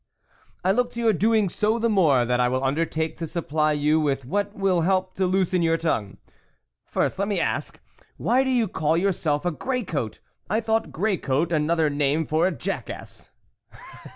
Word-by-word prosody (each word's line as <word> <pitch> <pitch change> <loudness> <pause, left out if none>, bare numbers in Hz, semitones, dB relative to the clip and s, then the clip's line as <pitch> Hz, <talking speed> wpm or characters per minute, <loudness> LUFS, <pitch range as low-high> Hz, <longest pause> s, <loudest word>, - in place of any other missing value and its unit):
" - - -35
I 190 - +4
look 245 +4 +1
to 235 - -6
your 230 -2 +3
doing 215 +2 +2
so 215 +5 0
the 230 0 +1
more, 160 - +3
that 125 +1 0
I 125 - +3
will 130 +1 -1
undertake 160 +3 -1
to 165 - -4
supply 155 -2 0
you 150 +2 +2
with 140 -4 -1
what 205 +8 -2
will 190 -3 +1
help 185 +1 +1
to 190 -1 0
loosen 185 -1 +1
your 165 0 +2
tongue. 110 -12 -2 0.7
First, - - -1
let 200 - 0
me 205 - 0
ask, - - -2 0.4
why 255 +2 +2
do 265 - -1
you 245 -4 +2
call 160 -2 0
yourself 170 -4 0
a 175 - +1
grey 250 - -2
coat? 140 - -4 0.3
I 215 +4 +2
thought 225 0 -1
grey 200 +2 0
coat 150 +5 -1
another 160 0 +2
name 145 +2 +1
for 160 +4 +2
a - - 0
jack 160 - -4
ass." - - -9
170 Hz, 195 wpm, -24 LUFS, 150-200 Hz, 0.7 s, I